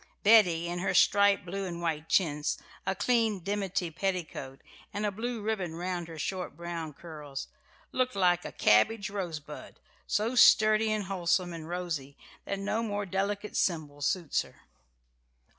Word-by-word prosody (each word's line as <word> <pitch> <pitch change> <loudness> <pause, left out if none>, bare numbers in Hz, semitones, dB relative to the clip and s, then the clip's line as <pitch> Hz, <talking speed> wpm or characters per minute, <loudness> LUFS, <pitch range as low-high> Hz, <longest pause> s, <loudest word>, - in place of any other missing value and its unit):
Betty, 180 -6 +5
in 175 +1 -3
her 190 +1 -1
striped 200 0 +4
blue 195 +2 -4
and 170 -2 -5
white 160 -2 -2
chintz, 150 -5 +1 0.3
a 190 - +1
clean 220 0 +1
dimity 195 -2 -2
petticoat, 165 -7 -4 0.3
and 210 0 -2
a 205 - 0
blue 230 +2 -4
ribbon 195 -7 -2
round 175 0 -3
her 165 -1 -9
short 185 +4 -4
brown 170 -2 -5
curls, 150 -3 -8 0.4
looked 255 -2 0
like 180 -2 +3
a - - -6
cabbage 200 - +3
rosebud 170 -7 -6 0.3
so 220 +3 0
sturdy 215 -2 +6
and 215 -1 0
wholesome 180 -2 0
and 165 -1 -8
rosy 165 -6 -4 0.3
that 200 - -2
no 205 +3 -1
more 205 -2 -2
delicate 200 +2 -2
symbol 150 -5 -1
suits 165 +1 +1
her. - - -14
185 Hz, 150 wpm, -29 LUFS, 165-205 Hz, 0.4 s, sturdy